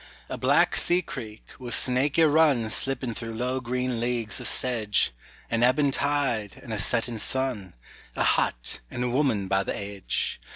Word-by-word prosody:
A -, -, -3 dB
black -, -, +3 dB
sea 180 Hz, +1 st, +4 dB
creek, 115 Hz, -10 st, -8 dB, 0.2 s
with 120 Hz, -2 st, -2 dB
snaky 135 Hz, +5 st, +2 dB
run 145 Hz, -7 st, +3 dB
Slipping 130 Hz, -2 st, 0 dB
through 115 Hz, 0 st, -6 dB
low 125 Hz, +3 st, -1 dB
green 125 Hz, -1 st, -2 dB
leagues 120 Hz, -2 st, -1 dB
of -, -, -3 dB
sedge, 110 Hz, -5 st, +1 dB, 0.4 s
An 115 Hz, 0 st, +1 dB
ebbing 135 Hz, +3 st, +3 dB
tide, 135 Hz, -8 st, -1 dB
and 115 Hz, -, -6 dB
a 105 Hz, -, -2 dB
setting 115 Hz, +3 st, 0 dB
sun; 125 Hz, -, -2 dB, 0.4 s
A -, -, +1 dB
hut -, -, 0 dB
and 120 Hz, -, -4 dB
a 125 Hz, -, 0 dB
woman 120 Hz, -7 st, +1 dB
by 95 Hz, +1 st, +1 dB
the -, -, -3 dB
edge. 100 Hz, -1 st, -3 dB
120 Hz, 165 wpm, -26 LUFS, 110-135 Hz, 0.4 s, sea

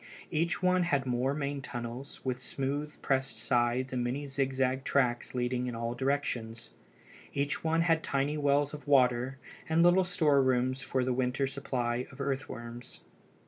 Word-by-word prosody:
Each 165 Hz, +1 st, +1 dB
had -, -, -10 dB
one 180 Hz, 0 st, +4 dB
or 150 Hz, -5 st, +2 dB
more 125 Hz, +2 st, 0 dB
main 140 Hz, -1 st, -2 dB
tunnels, 120 Hz, +1 st, -6 dB
with 125 Hz, -1 st, -2 dB
smooth 140 Hz, +3 st, -3 dB
pressed 135 Hz, -3 st, 0 dB
sides 120 Hz, +3 st, +1 dB
and 125 Hz, -1 st, 0 dB
many 130 Hz, +4 st, -2 dB
zigzag 135 Hz, -1 st, 0 dB
side -, -, -19 dB
tracks 125 Hz, -3 st, +1 dB
leading 125 Hz, 0 st, 0 dB
in 120 Hz, -, -3 dB
all 115 Hz, +1 st, -2 dB
directions. 120 Hz, -3 st, -2 dB, 0.6 s
Each 140 Hz, +1 st, -1 dB
one 165 Hz, +1 st, +2 dB
had 165 Hz, -1 st, +3 dB
tiny 140 Hz, +1 st, 0 dB
wells 145 Hz, 0 st, +2 dB
of 150 Hz, 0 st, -9 dB
water, 130 Hz, -1 st, +3 dB, 0.3 s
and 160 Hz, +1 st, +4 dB
little 175 Hz, +2 st, +6 dB
storerooms 135 Hz, -7 st, +2 dB
for 130 Hz, -1 st, 0 dB
the 125 Hz, 0 st, +1 dB
winter 130 Hz, +2 st, 0 dB
supply 125 Hz, -3 st, -2 dB
of -, -, -14 dB
earthworms. 125 Hz, -4 st, -5 dB
135 Hz, 160 wpm, -31 LUFS, 125-145 Hz, 0.6 s, little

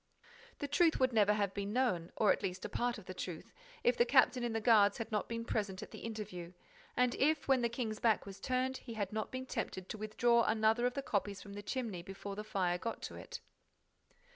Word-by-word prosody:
The 285 Hz, -, -3 dB
truth 320 Hz, +3 st, +3 dB
would 260 Hz, -1 st, +3 dB
never 210 Hz, -2 st, +5 dB
have 200 Hz, -2 st, 0 dB
been 200 Hz, 0 st, -3 dB
known, 185 Hz, -10 st, +1 dB
or 215 Hz, -, +4 dB
at -, -, 0 dB
least 185 Hz, 0 st, -3 dB
a -, -, -3 dB
part 245 Hz, 0 st, -1 dB
of 210 Hz, -, -11 dB
the 185 Hz, -, -6 dB
truth, 180 Hz, -3 st, -6 dB, 0.3 s
if 245 Hz, -, +4 dB
the 240 Hz, -, +5 dB
captain 255 Hz, 0 st, +4 dB
in 240 Hz, -, 0 dB
the 225 Hz, -, 0 dB
guards 210 Hz, -3 st, +5 dB
had 225 Hz, 0 st, -5 dB
not 210 Hz, -1 st, -1 dB
been 230 Hz, 0 st, -3 dB
present 205 Hz, -3 st, -2 dB
at -, -, -11 dB
the -, -, -8 dB
interview 205 Hz, -6 st, -6 dB, 0.4 s
and 250 Hz, -1 st, +3 dB
if, 305 Hz, +1 st, +2 dB
when 265 Hz, -2 st, +4 dB
the 235 Hz, -, +1 dB
king's 230 Hz, -3 st, -3 dB
back 225 Hz, -3 st, +2 dB
was 195 Hz, 0 st, -9 dB
turned, 255 Hz, +3 st, 0 dB
he 230 Hz, -3 st, -9 dB
had 205 Hz, -2 st, -2 dB
not 215 Hz, 0 st, -2 dB
been 255 Hz, 0 st, -4 dB
tempted 190 Hz, -6 st, -4 dB
to 215 Hz, -, -5 dB
withdraw 235 Hz, +3 st, +3 dB
another 220 Hz, +2 st, +3 dB
of 250 Hz, -, -4 dB
the 275 Hz, -, -2 dB
copies 200 Hz, -4 st, -1 dB
from 200 Hz, +1 st, -10 dB
the 205 Hz, -, -6 dB
chimney, 215 Hz, -5 st, -3 dB
before 195 Hz, +2 st, -7 dB
the 210 Hz, -, -5 dB
fire 180 Hz, -4 st, 0 dB
got 230 Hz, +3 st, -4 dB
to -, -, -5 dB
it. -, -, -8 dB
220 Hz, 235 wpm, -35 LUFS, 200-245 Hz, 0.4 s, never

